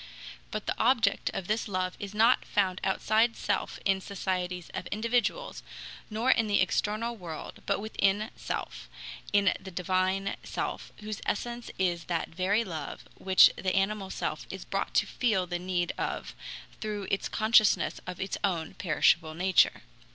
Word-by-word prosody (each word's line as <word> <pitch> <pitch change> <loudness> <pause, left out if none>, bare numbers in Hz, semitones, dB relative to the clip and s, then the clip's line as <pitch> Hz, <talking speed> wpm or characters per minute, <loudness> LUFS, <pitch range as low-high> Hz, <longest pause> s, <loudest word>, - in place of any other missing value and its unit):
But 215 -1 -4
the - - 0
object 230 -4 +3
of 190 - -4
this 215 +5 -1
love 185 -2 -1
is 200 0 -6
not 230 +4 +5
found 190 -2 0
outside 220 +4 +2
self - - -1
in 195 -1 +2
societies 180 -3 -3
of 180 - -4
individuals, 245 - -1 0.5
nor 225 +4 +2
in 225 -3 +3
the 205 - +3
external 215 +5 0
world, 170 -7 -8
but - - +1
within 210 0 0
self, - - -5 0.4
in 200 -1 +4
the 190 - -9
divine 185 +2 0
self - - -4
whose 215 0 -5
essence 240 +2 -2
is 175 -3 0
that 170 -2 -2
very 190 +6 +1
love, 160 -8 -6 0.2
which 190 -1 +7
the 185 -1 -1
animal 195 0 0
self - - -3
is - - -7
brought - - -2
to - - +4
feel 215 -7 +1
the 175 0 -3
need 180 -1 -1
of - - -3 0.5
through 210 -2 -4
its 195 - 0
consciousness 215 -2 +4
of 180 -1 -6
its 190 - -3
own 170 -5 0
perishable 155 -2 +2
nature. 185 +2 +3
195 Hz, 155 wpm, -29 LUFS, 185-215 Hz, 0.5 s, which